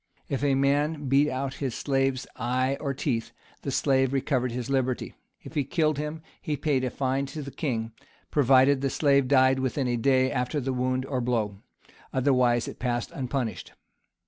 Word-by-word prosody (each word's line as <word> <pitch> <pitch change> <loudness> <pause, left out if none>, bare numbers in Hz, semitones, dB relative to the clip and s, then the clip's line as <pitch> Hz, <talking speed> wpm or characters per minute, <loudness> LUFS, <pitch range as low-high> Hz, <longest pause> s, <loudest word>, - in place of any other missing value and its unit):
If 140 -1 -2
a 140 -2 +3
man 145 +2 +1
beat 140 +2 +4
out 130 0 -3
his 130 -5 -2
slave's 135 -2 0
eye 130 +2 0
or 140 - -2
teeth, 130 -4 -2 0.3
the - - -4
slave 135 -1 +2
recovered 130 -2 0
his 125 +1 -4
liberty:[] 130 -2 -1 0.3
if - - -10
he 150 -3 +1
killed 155 +1 0
him, 150 +1 -4 0.2
he 150 -1 -2
paid 140 -4 0
a 130 - 0
fine 135 +2 -1
to 150 +2 -6
the 140 - -7
king, 115 -8 -2 0.4
provided 135 0 +4
the 135 - +1
slave 140 -2 +3
died 130 -1 +4
within 130 0 -1
a 120 -1 0
day 130 +2 +3
after 125 +3 -1
the 135 -1 -2
wound 130 +1 0
or 130 -2 -2
blow; 110 -5 -1 0.5
otherwise 125 -3 +2
it - - -8
passed 120 -1 -2
unpunished. 130 -3 -3
135 Hz, 175 wpm, -27 LUFS, 125-140 Hz, 0.5 s, beat